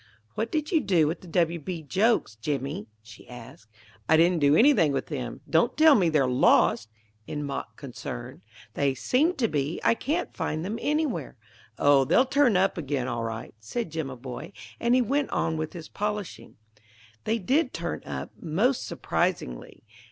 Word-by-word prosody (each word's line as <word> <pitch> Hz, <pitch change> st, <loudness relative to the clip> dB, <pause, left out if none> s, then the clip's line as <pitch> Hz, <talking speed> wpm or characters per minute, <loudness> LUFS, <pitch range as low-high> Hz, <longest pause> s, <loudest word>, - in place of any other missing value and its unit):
"What 225 Hz, +2 st, -3 dB
did 305 Hz, +1 st, -2 dB
you 325 Hz, -4 st, +3 dB
do 175 Hz, -, +3 dB
with 160 Hz, +3 st, -2 dB
the 180 Hz, -, -13 dB
W. 170 Hz, 0 st, +1 dB
B. 165 Hz, +1 st, -6 dB
jokes, 190 Hz, -, +1 dB
Jimmy?" 135 Hz, -1 st, -3 dB, 0.2 s
she 110 Hz, +2 st, -15 dB
asked. 115 Hz, -2 st, -12 dB, 0.4 s
"I 160 Hz, -, +6 dB
didn't 170 Hz, +1 st, +4 dB
do 145 Hz, 0 st, +4 dB
anything 230 Hz, -, +5 dB
with -, -, -1 dB
them. -, -, -5 dB
Don't -, -, +2 dB
tell 315 Hz, -1 st, +7 dB
me 185 Hz, -9 st, +3 dB
they're 150 Hz, -4 st, +3 dB
lost!" 125 Hz, -3 st, +3 dB, 0.4 s
in 150 Hz, 0 st, -4 dB
mock 140 Hz, -1 st, -5 dB
concern. -, -, -8 dB, 0.3 s
"They 140 Hz, -2 st, 0 dB
seem 300 Hz, -, +1 dB
to 235 Hz, -, +1 dB
be; 150 Hz, -1 st, -2 dB
I -, -, +5 dB
can't 310 Hz, +9 st, -2 dB
find 155 Hz, +2 st, -3 dB
them 215 Hz, +4 st, -4 dB
anywhere." 290 Hz, -, -1 dB, 0.4 s
"Oh, 145 Hz, -1 st, +5 dB
they'll 250 Hz, -, +4 dB
turn 265 Hz, -6 st, +3 dB
up 190 Hz, -1 st, +1 dB
again 140 Hz, -4 st, -2 dB
all 120 Hz, -2 st, -2 dB
right," 115 Hz, +1 st, -5 dB
said 165 Hz, -, -4 dB
Jimaboy; 135 Hz, -1 st, -6 dB, 0.3 s
and 235 Hz, +1 st, +2 dB
he 255 Hz, -, +4 dB
went 275 Hz, +5 st, 0 dB
on 165 Hz, -1 st, -1 dB
with 155 Hz, -1 st, -4 dB
his 165 Hz, -3 st, -8 dB
polishing. 210 Hz, -3 st, -5 dB, 0.7 s
They 225 Hz, -, +1 dB
did 270 Hz, -, +1 dB
turn -, -, -4 dB
up, -, -, -6 dB
most 215 Hz, -, 0 dB
surprisingly. 170 Hz, -, -3 dB
165 Hz, 170 wpm, -26 LUFS, 140-230 Hz, 0.7 s, tell